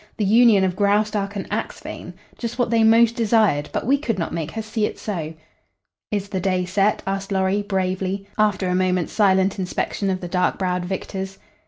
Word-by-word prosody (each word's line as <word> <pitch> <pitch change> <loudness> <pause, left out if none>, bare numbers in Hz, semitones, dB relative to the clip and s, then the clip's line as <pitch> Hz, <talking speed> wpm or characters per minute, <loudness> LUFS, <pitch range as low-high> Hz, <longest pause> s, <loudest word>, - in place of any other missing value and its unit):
The 210 - 0
union 220 -1 +5
of 185 -1 0
Graustark 205 0 +1
and 195 - -3
Axphain! - - -5 0.3
Just 235 0 -4
what 245 -2 0
they 230 -1 +4
most 230 +1 +5
desired, 215 - +2
but - - -2
we 275 +4 +3
could 230 -8 -2
not 170 - -3
make 165 -2 -3
her 220 +6 -5
see 215 0 -1
it - - -8
so." 165 -6 -4 0.8
"Is 205 -1 -2
the 190 - -2
day 185 0 0
set?" 195 +3 +1
asked 195 +1 -3
Lorry, 190 +1 +1
bravely, 190 0 -2
after 210 -3 +1
a 180 - 0
moments 180 -2 0
silent 195 -1 +3
inspection 190 +2 -2
of 185 -1 -1
the 180 - -6
dark 180 +1 0
browed 180 -1 -1
victors. 190 +1 -5
195 Hz, 190 wpm, -22 LUFS, 185-215 Hz, 0.8 s, union